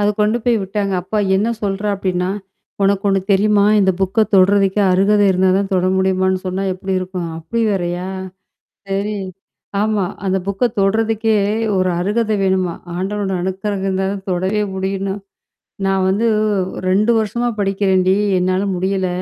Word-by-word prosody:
அத 205 - +2
கொண்டு 215 +3 +2
போய் 240 -2 +3
விட்டாங்க. 195 +1 -2
அப்ப 185 - -9 0.2
என்னா 210 +4 +1
சொல்றா 200 +1 -1
அப்டின்னா? 185 -1 -1 0.5
உனக்கு 200 +1 +2
ஒண்ணு 195 -1 +2
தெரியுமா? 205 +1 +3 0.2
இந்த 190 -1 +3
புக்க 190 +3 -1 0.2
தொடறதுக்கே 195 +1 +4
அருகதை 205 +3 +3
இருந்தா 190 0 +2
தான் 200 -1 -2
தொட 185 -1 +2
முடியுமான்னு 190 0 +1
சொன்னா 185 +1 -2
எப்படி 190 +1 -5
இருக்கும்? 185 -2 -4
அப்டி 230 +9 -2
வேறையா? 180 -1 -2 0.8
சரி 200 +2 -2 0.6
ஆமா. 210 -2 +1 0.2
அந்த 190 0 +1
புக்க 200 +5 0
தொடுறதுக்கே 220 +2 +1 0.4
ஒரு 185 0 +2
அருகதை 215 +3 0
வேணுமாம்! 185 -2 0
ஆண்டவனோட 195 +2 -2
அணுக்கறகம் 190 +1 -3
இருந்தா 190 0 0
தான் 195 -1 -6
தொடவே 190 +4 0
முடியும்ன்னு 195 0 -2 0.7
"நான் 195 -1 +1
வந்து, 205 +5 +1 0.3
ஒ - - +1 0.3
2 210 +5 +3
வருஷமா 230 +3 -1
படிக்கிறேன் 195 -1 +1
டி 190 - +5 0.2
என்னால 185 +1 +1
முடியல! 190 +1 -1
195 Hz, 145 wpm, -18 LUFS, 185-205 Hz, 0.8 s, டி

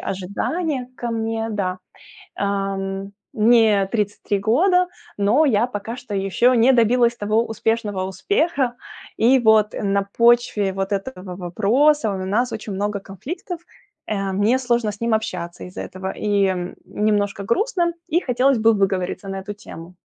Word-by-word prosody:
ожидания 250 - -3
ко 240 - -4
мне, 225 0 -2
да. 185 -3 -2 0.6
Эм, 195 0 -2 0.2
мне 215 -3 +4
33 205 -2 -1
года, 360 - +3 0.3
но 215 +10 +3
я 235 -3 +3
пока 225 0 -5
что 245 -4 -7
еще 200 +6 +2
не 240 +3 +5
добилась 235 0 +3
того 215 +2 +1
успешного 220 -3 -1
успеха. 260 - 0 0.4
И 250 +4 +5
вот 220 -2 +4
на 200 -1 0 0.2
почве 235 -4 +3
вот 195 +1 -3
этого 195 -3 -4
вопроса 220 - +2
у 195 - -3
нас 235 +6 0
очень 210 -2 -5
много 205 +1 -2
конфликтов, 320 - -7 0.5
э, 195 -2 -2
мне 210 +6 +2
сложно 240 -4 0
с 205 - -13
ним 230 -1 +1
общаться 180 -5 -4
из-за 180 - -8
этого 190 0 -5
и 195 -3 0
немножко 205 -1 0
грустно, 350 - +1
и 340 - +1
хотелось 260 -2 +2
бы 225 +1 +5
выговориться 195 -1 -1
на 195 - -4
эту 205 +2 -7
тему. 180 -4 -11
215 Hz, 145 wpm, -21 LUFS, 195-240 Hz, 0.6 s, не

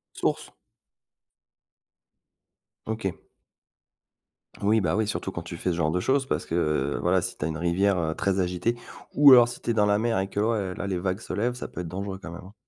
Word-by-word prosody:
Sources? - - -1 2.4
OK. 110 -4 -3 1.5
Oui, 105 +1 +3
bah, 85 0 0
oui, 110 -1 +1
surtout 95 -2 -3
quand 85 - -6
tu 85 - -7
fais 90 - -2
ce 85 - 0
genre 80 -2 +1
de 90 - 0
choses 135 +7 +1
parce - - -2
que, 85 - -2
heu, 75 -4 0
voilà, 90 +1 +2
si - - -4
tu 75 - -3
as - - 0
une 80 -1 -3
rivière, 90 +4 +1
heu, 80 -1 -1
très 100 -1 0
agitée 90 +6 0 0.4
ou 145 -1 +8
alors 120 -2 +9
si 120 - -8
tu - - -5
es - - +3
dans 105 -2 +3
la 105 0 +2
mer 115 -2 0
et 95 0 -2
que, 100 - -3
ouais, 105 -4 0
là 100 - -4
les 95 - -1
vagues 95 +2 -2
se - - -7
lèvent, 120 +4 0
ça 125 - -6
peut 90 - -7
être 85 - -6
dangereux 95 +2 -5
quand 85 - -8
même, 85 - -8
hein. 95 - -13
95 Hz, 225 wpm, -26 LUFS, 85-110 Hz, 2.4 s, alors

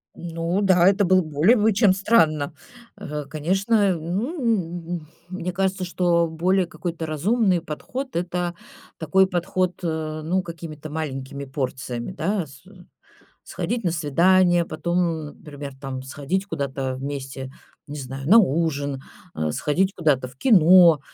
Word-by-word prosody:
Ну 170 +2 -2
да, 185 -3 +4
это 200 +1 +4
было 185 +1 +4
более 155 - +3
бы, 220 -1 +3
чем 205 -2 +4
странно. 160 -8 +2 0.4
Э, 150 -1 -5
конечно, 190 +6 +1
ну, 175 - -2
м, 155 -2 -13 0.2
мне 180 -1 -4
кажется, 190 +1 -1
что 175 -1 +1
более 180 +4 +1
какой-то 170 -1 -5
разумный 185 +4 +1
подход- 250 - -6
это 175 0 -2 0.4
такой 190 +5 +3
подход, 185 0 -1
э, 160 -2 -3
ну, 180 +4 0
какими-то 160 -3 -8
маленькими 140 -2 -5
порциями, 130 -1 -4
да. 190 +1 -1
С 135 -1 -16 0.8
сходить 240 -1 -3
на 175 - +1
свидание. 175 +3 +3
Потом, 170 +1 -3
ну, 160 -4 -1
например, 145 -2 -9
там, 135 -2 -5
сходить 145 +9 -3
куда-то 135 -5 -3
вместе, 135 -1 -6 0.4
не 145 +1 -6
знаю, 135 +1 -6
на 220 +7 +8
ужин, 145 -6 0 0.3
э, 80 -1 -1
сходить 185 - 0
куда-то 145 -6 +1
в 125 - -16
кино, 175 - +6
170 Hz, 135 wpm, -23 LUFS, 145-185 Hz, 0.8 s, на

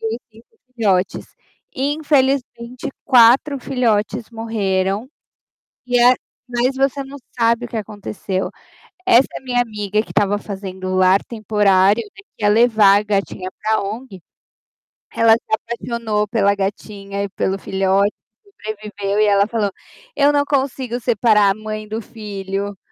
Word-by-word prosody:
e 225 0 -2
os - - -12
5 225 +2 -18 0.3
filhotes. 195 -5 0 0.5
Infelizmente 270 -3 0 0.2
4 260 +3 +5
filhotes 235 -3 -1
morreram, 210 -2 -1 0.8
e 245 -1 +2
a 245 +1 +7 0.4
mas 245 +2 +1
você 275 +1 0
não 270 +1 -10 0.2
sabe 230 +1 +2
o - - -15
que 240 - -6
aconteceu, 205 -2 -4 0.5
essa 265 -8 +5 0.2
minha 245 -2 0
amiga 210 -3 -1
que 220 - -7
estava 205 0 +1
fazendo 190 -2 -7
o 185 - -1
lar 185 +1 +4
temporário, 210 -2 +2
né, 225 - -15 0.2
que - - -11
ia - - +5
levar 215 -2 +5
a - - -4
gatinha 195 -2 -2
para 220 0 +1
ONG, 205 -1 -7 0.9
ela 230 -1 +5
se 230 - -2
apaixonou 230 -2 -2
pela 200 -2 +2
gatinha 200 0 -4
e 200 - -4
pelo 190 0 -2
filho 190 0 -2 0.5
sobreviveu 210 - -5
e - - +5
ela 200 -1 +3
falou: 215 -3 -1 0.4
"Eu 285 0 +4
não 285 0 +3
consigo 265 -3 -1
separar 220 -3 +3
a - - -2
mãe 215 0 -6
do 220 +2 -4
filho, 200 -2 -5
215 Hz, 140 wpm, -19 LUFS, 200-240 Hz, 0.9 s, a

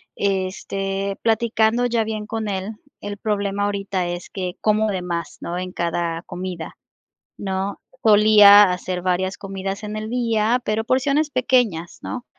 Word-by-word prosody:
este, 195 0 -2
platicando 225 +1 +2
ya 230 -2 +1
bien 215 -1 -4
con 220 -1 -3
él, 195 +3 -3 0.3
el 205 0 -5
problema 205 -1 -1
ahorita 200 -3 -1
es 175 0 -5
que 185 -2 -5
como 215 0 +2
de 185 -2 -2
más, 170 -2 -4
¿no?, 175 +1 -4
en 185 0 -4
cada 170 -1 -2
comida, 180 -2 -7 0.6
¿no?, 195 0 -3 0.2
solía 210 -2 +8
hacer 180 0 -4
varias 185 +1 0
comidas 195 0 -5
en 210 0 -5
el 215 0 -4
día, 235 0 +1
pero 215 +1 -1
porciones 280 +5 +1
pequeñas, 245 - +1
¿no?, 245 -1 -5
200 Hz, 145 wpm, -22 LUFS, 185-220 Hz, 0.6 s, solía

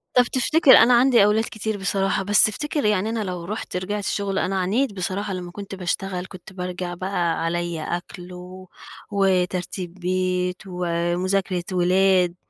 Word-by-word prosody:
طب 250 - +7
تفتكر 265 +4 +3
أنا 245 +2 +6
عندي 240 -3 +5
أولاد 210 +2 +3
كتير 220 -1 -3
بصراحة، 195 0 0
بس 205 +2 +5
افتكر 295 +3 -3
يعني 210 0 +1
أنا 225 -2 -2
لو 180 -3 -5
رُحت 210 -1 -5
رجعت 205 +2 -3
شُغل، 200 -1 -1
أنا 190 0 -1
عانيت 210 +6 0
بصراحة 195 +2 -3
لمّا 180 -1 -6
كنت 200 0 -8
باشتغل، 185 0 -3
كنت 185 0 -12
بارجع 180 -1 -5
بقى 175 -3 -1
عليّا 170 -1 -2
أكل 175 +1 -6
و 185 +1 -11 0.4
وترتيب 185 -2 0
بيت 180 0 -1
ومُذاكرة 180 +1 -1
ولاد. 180 0 +3
185 Hz, 150 wpm, -23 LUFS, 180-205 Hz, 0.4 s, طب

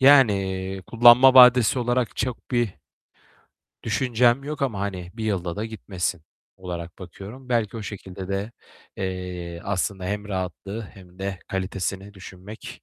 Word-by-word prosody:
yani 95 -8 +4
kullanma 120 +3 +7
vadesi 125 -1 +7
olarak 120 -2 0
çok 125 -2 -3
bir 120 -6 0 1.1
düşüncem 125 +1 +2
yok 150 -1 -4
ama, 110 -8 -1
hani, 90 -3 -4
1 110 -1 -5
yılda 95 -4 -2
da 105 - -2
gitmesin 95 -6 -4 0.3
olarak 85 -2 -7
bakıyorum. 100 +8 -10
Belki 115 -3 0
o 110 - -5
şekilde 95 -2 -7
de, 100 +3 -3 0.4
eee, 90 -2 -5
aslında 95 -1 -2
hem 105 +2 -3
rahatlığı 95 +3 -4
hem 95 -3 -14
de 95 -1 -4
kalitesini 95 +1 -3
düşünmek 95 +2 -10
100 Hz, 130 wpm, -24 LUFS, 95-120 Hz, 1.1 s, kullanma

